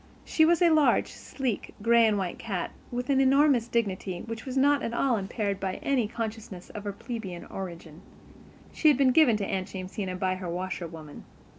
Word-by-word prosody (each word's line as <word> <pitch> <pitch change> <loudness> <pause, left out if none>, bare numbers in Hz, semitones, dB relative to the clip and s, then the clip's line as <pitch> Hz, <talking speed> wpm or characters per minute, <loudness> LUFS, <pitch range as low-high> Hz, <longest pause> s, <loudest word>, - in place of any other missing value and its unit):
She 315 - +3
was 345 +2 +3
a 340 - +5
large, 310 -2 +3
sleek, 255 -6 -4
gray 230 +1 +5
and 210 -1 +1
white 185 -3 -3
cat, 195 -6 -3 0.2
with 245 +3 -2
an 270 -1 +4
enormous 270 -3 +4
dignity 195 -6 -2
which 230 +2 -7
was 260 +1 -3
not 285 +1 +4
at 230 - -3
all 260 -1 +2
impaired 200 0 -2
by 190 -1 -2
any 260 -6 +1
consciousness 220 -5 -6
of 210 -1 -8
her 205 - -2
plebian 195 -4 -7
origin. 170 -4 -8 0.7
She 315 - +2
had 295 -4 +6
been 270 -2 +4
given 255 -6 +5
to 205 - -2
Aunt 190 -1 -2
Jamesina 185 0 -5
by 185 0 -1
her 185 -2 -5
washerwoman. 170 -4 -6
215 Hz, 185 wpm, -27 LUFS, 185-260 Hz, 0.7 s, had